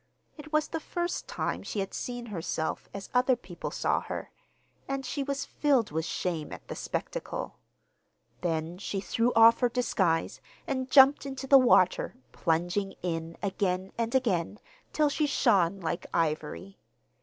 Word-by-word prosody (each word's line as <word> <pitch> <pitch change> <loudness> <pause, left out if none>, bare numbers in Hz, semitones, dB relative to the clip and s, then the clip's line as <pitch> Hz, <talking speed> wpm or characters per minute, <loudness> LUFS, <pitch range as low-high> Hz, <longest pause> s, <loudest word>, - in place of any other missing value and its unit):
It 300 -1 -11
was 305 0 +2
the 325 - -3
first 345 +2 -3
time - - -2
she 210 - -4
had 195 0 -3
seen 245 -1 -4
herself 165 -6 -3
as 200 -1 -7
other 250 +1 +4
people 180 -7 -7
saw - - 0
her, - - -6 0.6
and 275 0 -3
she 280 +3 -3
was 280 0 -2
filled 270 - +1
with 160 +1 -1
shame 165 -5 -3
at - - -9
the - - -5
spectacle. - - -4 0.8
Then 165 0 -2
she 200 -1 -3
threw 230 +5 +1
off 230 +1 +7
her 245 - +3
disguise 190 -9 0 0.2
and 260 -1 -2
jumped 270 +1 +7
into 270 0 -5
the 275 0 +8
water, 185 -8 +4 0.2
plunging 175 +4 -1
in 165 -1 -3
again 190 -1 -1
and 230 +1 -1
again, 205 -7 +1 0.3
till 305 -1 +2
she 300 +1 +1
shone 200 -9 +3
like 170 -1 -3
ivory. 165 +4 -2
210 Hz, 155 wpm, -29 LUFS, 175-270 Hz, 0.8 s, the